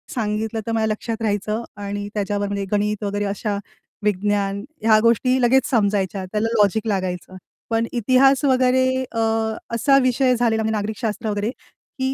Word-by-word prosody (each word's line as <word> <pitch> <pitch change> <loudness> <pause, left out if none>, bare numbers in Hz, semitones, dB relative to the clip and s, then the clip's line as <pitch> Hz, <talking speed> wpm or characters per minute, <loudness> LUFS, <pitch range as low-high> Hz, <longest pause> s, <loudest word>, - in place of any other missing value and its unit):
सांगितलं 220 0 -2
तर 230 - -3
माझ्या 220 -1 +1
लक्षात 225 +1 -3
राहायचं 215 +1 -1 0.2
आणि 205 0 -4
त्याच्यावर 205 0 -1
म्हणजे 200 -1 -3
गणित 210 0 0
वगैरे 205 0 -1
अशा 205 +1 -2 0.5
विज्ञान 200 0 0 0.2
ह्या 220 -1 +5
गोष्टी 255 +3 +3
लगेच 260 +2 +4
समजायच्या. 200 -5 0
त्याला 210 +4 -1
लॉजिक 215 0 +2
लागायचं. 185 -3 -3 0.3
पण 225 0 +1
इतिहास 255 +4 +3
वगैरे 260 -1 +3 0.3
अ, 230 - -3 0.6
असा 275 +4 +4
विषय 255 0 +2
झालेला 225 -2 +1
म्हणजे 220 0 0
नागरिक 210 +1 -3
शास्त्र 220 0 -2
वगैरे, 205 +2 -1
की 265 0 -6
215 Hz, 155 wpm, -21 LUFS, 205-235 Hz, 0.6 s, ह्या